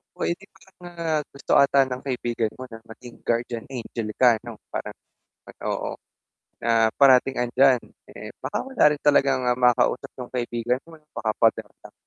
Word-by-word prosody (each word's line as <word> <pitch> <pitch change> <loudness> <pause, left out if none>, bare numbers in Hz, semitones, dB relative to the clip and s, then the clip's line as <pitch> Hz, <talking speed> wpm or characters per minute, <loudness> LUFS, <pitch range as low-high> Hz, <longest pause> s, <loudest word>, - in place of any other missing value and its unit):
Oh, - - -5
eh, - - +1
di 195 - -15
parang, 190 -1 -24
ah, 165 -3 -2
gusto 140 0 -8
ata 140 0 +5
ng 130 -1 -5
kaibigan 120 -4 -2
mo 130 - -8
na 115 - -9
maging 120 +1 -13
guardian 115 -1 -1
angel 120 -3 -5
ka 120 -3 +4
ano, - - -9 0.2
parang - - -5 0.5
pag - - -14
oo, - - -3 0.7
na 115 -1 +3
parating 135 -1 +5
'andiyan. 125 +1 +4 0.3
Eh, - - -9
baka - - -2
wala 265 -1 -1
rin 150 - -3
talagang, 135 -3 +3
ah, 125 - +3
makausap 125 0 +2
yung 125 - -7
kaibigan 120 0 -1
mo 165 -1 -14
'no, 150 - -37
baka 110 -1 -1
pader 115 -1 +2 0.2
lang? - - -14
125 Hz, 180 wpm, -24 LUFS, 120-140 Hz, 0.7 s, ata